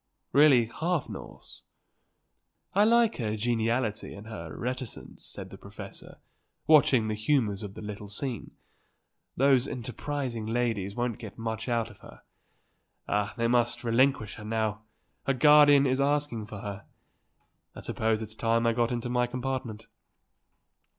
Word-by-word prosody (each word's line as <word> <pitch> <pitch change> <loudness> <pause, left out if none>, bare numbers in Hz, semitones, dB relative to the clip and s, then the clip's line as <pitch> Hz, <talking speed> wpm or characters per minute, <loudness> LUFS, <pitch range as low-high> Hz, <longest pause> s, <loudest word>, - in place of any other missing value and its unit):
"Really 140 -5 +6
half 160 +7 -2
Norse." - - -10 1.1
"I 200 - +5
like 230 0 +4
her 110 -3 -2
geniality 115 -1 -1
and 100 +1 -10
her 85 -8 -8
reticence," 125 -1 -5
said - - -8
the - - -11
professor, - - -10 0.5
watching 135 -7 +5
the 110 - -1
humours 105 -2 +1
of 100 -2 -7
the - - -8
little 105 -1 -7
scene. 120 +2 -4 0.9
"Those 135 -1 +4
enterprising 125 -2 -4
ladies 110 -4 -1
won't 120 -2 -2
get 110 -3 -9
much 115 +1 -4
out 115 -2 0
of 105 - -18
her. - - -15 0.8
Ah, 105 0 -1
they 115 0 +1
must 120 0 +1
relinquish 120 -2 +2
her 105 - -9
now; 110 -1 -1 0.5
her 135 - +3
guardian 145 0 +7
is 130 +1 +1
asking 140 -6 0
for 105 -3 -8
her. 100 0 -6 0.9
I - - -8
suppose 110 0 0
it's 110 0 -6
time 115 +1 +1
that 115 - +3
I - - -2
got 120 0 +1
into 120 0 -2
my 125 0 +1
compartment." 125 -3 -4
115 Hz, 145 wpm, -28 LUFS, 110-130 Hz, 1.1 s, guardian